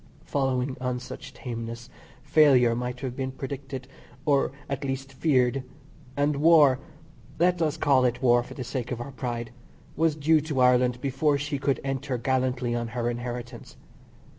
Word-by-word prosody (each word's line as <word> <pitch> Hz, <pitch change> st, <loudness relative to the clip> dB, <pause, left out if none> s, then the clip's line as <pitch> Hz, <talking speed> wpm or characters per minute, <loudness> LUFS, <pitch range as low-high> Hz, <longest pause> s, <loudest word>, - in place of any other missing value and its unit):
Following 130 Hz, -1 st, 0 dB
on 125 Hz, -1 st, -1 dB
such 125 Hz, -, -9 dB
tameness, 115 Hz, -1 st, -6 dB, 0.4 s
failure 130 Hz, -6 st, +5 dB
might 125 Hz, +1 st, -4 dB
have 130 Hz, -3 st, -4 dB
been 130 Hz, 0 st, -3 dB
predicted, 135 Hz, -1 st, -6 dB, 0.4 s
or, 140 Hz, -3 st, +2 dB, 0.2 s
at 140 Hz, 0 st, -3 dB
least 135 Hz, 0 st, -4 dB
feared, 130 Hz, -2 st, +2 dB, 0.6 s
and 145 Hz, 0 st, +1 dB
war 150 Hz, -4 st, +6 dB, 0.6 s
(let 175 Hz, +1 st, +2 dB
us 155 Hz, -1 st, +1 dB
call 135 Hz, -4 st, +3 dB
it 125 Hz, -1 st, 0 dB
war 120 Hz, -2 st, +4 dB
for 120 Hz, -, -10 dB
the 130 Hz, -, -4 dB
sake 125 Hz, 0 st, -4 dB
of 120 Hz, -, -3 dB
our 140 Hz, +4 st, -6 dB
pride) 120 Hz, -3 st, -4 dB, 0.4 s
was 160 Hz, 0 st, +2 dB
due 155 Hz, +1 st, +3 dB
to 150 Hz, -3 st, -3 dB
Ireland 125 Hz, -1 st, +4 dB
before 140 Hz, +2 st, +1 dB
she 145 Hz, 0 st, -3 dB
could 140 Hz, 0 st, 0 dB
enter 135 Hz, -1 st, -2 dB
gallantly 125 Hz, -1 st, 0 dB
on 120 Hz, 0 st, -2 dB
her 120 Hz, 0 st, -2 dB
inheritance. 120 Hz, 0 st, -7 dB
130 Hz, 160 wpm, -26 LUFS, 125-140 Hz, 0.6 s, war